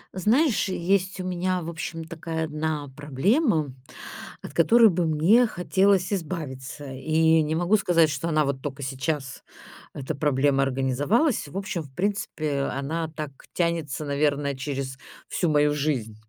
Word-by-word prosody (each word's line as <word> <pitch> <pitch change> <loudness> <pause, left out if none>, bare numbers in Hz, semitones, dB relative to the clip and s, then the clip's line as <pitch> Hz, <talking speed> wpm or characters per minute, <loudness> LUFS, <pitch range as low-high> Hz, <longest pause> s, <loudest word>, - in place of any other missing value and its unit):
Знаешь, 225 - +2
есть 190 +2 0
у - - -3
меня, 185 0 -1
в 165 - -5
общем, 165 0 -5
такая 160 0 -4
одна 155 -1 -3
проблема, 150 - +1 0.7
от - - -8
которой 225 +7 +6
бы 175 -2 0
мне 175 +11 +4
хотелось 190 0 +2
избавиться. 150 -6 -5
И 160 +4 +3
не 155 +1 -1
могу 175 +6 +3
сказать, 170 -5 +3
что 145 +4 -3
она 155 -2 +2
вот 140 -1 -2
только 140 0 -5
сейчас, 135 0 -3 0.5
эта 140 +2 -5
проблема, 140 -1 +2
организовалась. 135 - +1
В 145 - -7
общем, 195 -3 -3
в 145 -4 -12
принципе, 165 -7 -1
она 160 +4 -3
так 150 -2 -5 0.2
тянется, 165 -4 -1
наверное, 140 0 0
через 135 0 -4 0.3
всю 175 - 0
мою 150 -1 +3
жизнь. 140 -8 -1
155 Hz, 145 wpm, -25 LUFS, 140-180 Hz, 0.7 s, которой